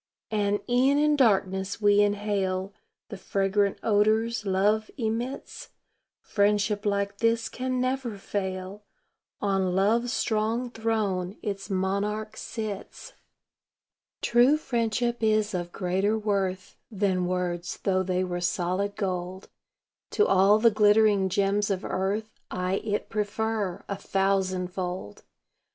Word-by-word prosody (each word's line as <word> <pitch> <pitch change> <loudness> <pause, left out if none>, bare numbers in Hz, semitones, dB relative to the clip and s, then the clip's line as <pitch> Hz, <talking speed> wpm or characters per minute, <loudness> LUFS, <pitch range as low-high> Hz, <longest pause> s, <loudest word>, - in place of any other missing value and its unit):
And 205 -1 +1
e'en 260 +3 +3
in 300 0 +3
darkness 195 -6 +1
we 205 -1 +5
inhale 200 -2 0 0.4
The 205 - -7
fragrant 200 +1 0
odors 215 +1 +2
love 205 +3 +2
emits; 235 +2 -4 0.5
Friendship 205 0 +1
like 200 0 -1
this 230 0 +2
can 255 0 -3
never 255 -3 -1
fail 190 0 -4 0.6
On 195 -2 +1
love's 230 +5 +2
strong 230 +2 0
throne 215 -5 -1
its 200 -2 -4
monarch 200 +3 -1
sits. 215 -3 -6 1.1
True 245 +5 +5
friendship 240 -3 -1
is 215 -1 +2
of 175 -1 -3
greater 190 +4 0
worth 195 -3 -2
Than 190 -4 0
words, 180 -1 -2
though 185 -1 +2
they 185 0 0
were 175 -1 -3
solid 185 +3 -1
gold. 185 -2 -4 0.6
To 420 - +4
all 195 +2 +5
the 230 +1 +5
glittering 210 -2 +4
gems 200 +2 +1
of 190 -2 -2
earth 205 +3 -2
I 185 +1 -1
it 205 -1 -2
prefer, 210 -2 -2
a 200 - -3
thousandfold. 185 - -1
205 Hz, 115 wpm, -27 LUFS, 190-220 Hz, 1.1 s, we